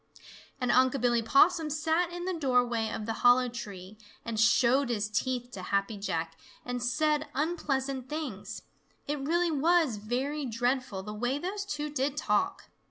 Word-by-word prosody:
And 250 Hz, -2 st, +1 dB
Unc' 260 Hz, +1 st, +4 dB
Billy 240 Hz, -1 st, +2 dB
Possum 310 Hz, +7 st, +4 dB
sat 320 Hz, +3 st, 0 dB
in 350 Hz, 0 st, -5 dB
the 375 Hz, -, -1 dB
doorway 245 Hz, -7 st, +1 dB
of 215 Hz, -, -4 dB
the 225 Hz, -, -2 dB
hollow 245 Hz, +1 st, +6 dB
tree 210 Hz, -4 st, -8 dB, 0.3 s
and 230 Hz, -2 st, -3 dB
showed 235 Hz, +4 st, +4 dB
his 215 Hz, -3 st, 0 dB
teeth 245 Hz, +3 st, -2 dB
to 195 Hz, -, -7 dB
Happy 200 Hz, +3 st, -1 dB
Jack 165 Hz, -5 st, -3 dB, 0.3 s
and 245 Hz, 0 st, -3 dB
said 300 Hz, +4 st, +1 dB
unpleasant 275 Hz, -4 st, -1 dB
things. 215 Hz, -10 st, -5 dB, 0.4 s
It 295 Hz, 0 st, -2 dB
really 335 Hz, +5 st, +1 dB
was 315 Hz, -4 st, +2 dB
very 260 Hz, +7 st, -2 dB
dreadful 245 Hz, -3 st, -1 dB
the 210 Hz, +1 st, -6 dB
way 245 Hz, +5 st, -1 dB
those 390 Hz, +6 st, -4 dB
two 300 Hz, -6 st, -3 dB
did 285 Hz, 0 st, -1 dB
talk. 300 Hz, -, -1 dB
255 Hz, 160 wpm, -29 LUFS, 225-300 Hz, 0.4 s, hollow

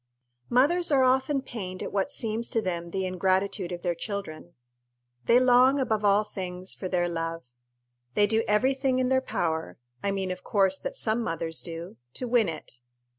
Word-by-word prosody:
Mothers 310 Hz, +8 st, +3 dB
are 275 Hz, -2 st, +5 dB
very 255 Hz, -, +5 dB
often 265 Hz, +2 st, +1 dB
pained 185 Hz, -8 st, -6 dB
at -, -, -5 dB
what 200 Hz, +7 st, 0 dB
seems 230 Hz, -2 st, -2 dB
to 225 Hz, -, +1 dB
them 170 Hz, -4 st, -3 dB
the 190 Hz, +2 st, -2 dB
ingratitude 185 Hz, +1 st, 0 dB
of 175 Hz, -1 st, -6 dB
their 175 Hz, -2 st, +1 dB
children. 175 Hz, -3 st, -6 dB, 0.7 s
They 240 Hz, -, +6 dB
long, 255 Hz, +2 st, +5 dB
above 220 Hz, -5 st, 0 dB
all 205 Hz, +1 st, +4 dB
things, 185 Hz, -2 st, -5 dB
for 185 Hz, -, -5 dB
their 180 Hz, -1 st, +1 dB
love. 165 Hz, -5 st, -4 dB, 0.6 s
They 205 Hz, -, +5 dB
do 220 Hz, +2 st, +1 dB
every 225 Hz, +6 st, +3 dB
thing 265 Hz, -1 st, 0 dB
in 255 Hz, -1 st, +1 dB
their 260 Hz, 0 st, +3 dB
power 160 Hz, -9 st, -2 dB, 0.2 s
I 200 Hz, -, 0 dB
mean, 195 Hz, -1 st, -1 dB
of 180 Hz, 0 st, -6 dB
course, 195 Hz, -2 st, +2 dB
that -, -, -5 dB
some 220 Hz, +1 st, 0 dB
mothers 165 Hz, -5 st, -3 dB
do 165 Hz, -5 st, -7 dB, 0.2 s
to 250 Hz, -, -3 dB
win 235 Hz, -5 st, +3 dB
it. 125 Hz, -6 st, -8 dB
200 Hz, 185 wpm, -27 LUFS, 175-245 Hz, 0.7 s, They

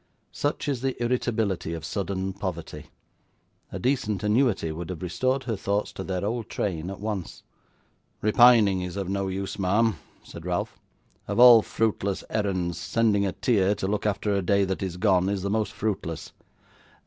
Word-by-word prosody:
Such 145 Hz, +1 st, -2 dB
is 135 Hz, -4 st, -1 dB
the 135 Hz, -2 st, -2 dB
irritability 110 Hz, -8 st, -1 dB
of 80 Hz, -1 st, -7 dB
sudden 95 Hz, +1 st, -3 dB
poverty. 85 Hz, -6 st, -6 dB, 0.8 s
A -, -, -4 dB
decent 110 Hz, -3 st, -1 dB
annuity 105 Hz, -6 st, +2 dB
would 85 Hz, +2 st, -6 dB
have 90 Hz, -1 st, -6 dB
restored 130 Hz, +9 st, 0 dB
her 115 Hz, -3 st, -2 dB
thoughts 100 Hz, +1 st, -1 dB
to 95 Hz, -, -6 dB
their 95 Hz, 0 st, -3 dB
old 115 Hz, +1 st, -3 dB
train, 85 Hz, -3 st, -2 dB
at 95 Hz, -, -7 dB
once. 105 Hz, -4 st, -5 dB, 0.8 s
'Repining 110 Hz, -4 st, +5 dB
is 90 Hz, 0 st, -5 dB
of 95 Hz, -2 st, -3 dB
no 100 Hz, 0 st, -1 dB
use, 95 Hz, +1 st, -4 dB
ma'am,' 105 Hz, +4 st, +2 dB, 0.3 s
said -, -, -10 dB
Ralph. -, -, -3 dB, 0.5 s
'Of -, -, -2 dB
all 120 Hz, -2 st, +10 dB
fruitless 105 Hz, -3 st, -1 dB
errands, 90 Hz, -5 st, -1 dB
sending 100 Hz, +1 st, +1 dB
a -, -, -1 dB
tear 100 Hz, -2 st, +2 dB
to 95 Hz, -, -3 dB
look 105 Hz, +1 st, -1 dB
after 105 Hz, 0 st, 0 dB
a 100 Hz, -, +1 dB
day 100 Hz, +2 st, +2 dB
that 95 Hz, 0 st, -3 dB
is 90 Hz, -2 st, -3 dB
gone 95 Hz, -2 st, +3 dB
is 100 Hz, -2 st, -2 dB
the 100 Hz, -, -1 dB
most 110 Hz, 0 st, 0 dB
fruitless. 95 Hz, -7 st, -4 dB
100 Hz, 170 wpm, -26 LUFS, 95-110 Hz, 0.8 s, all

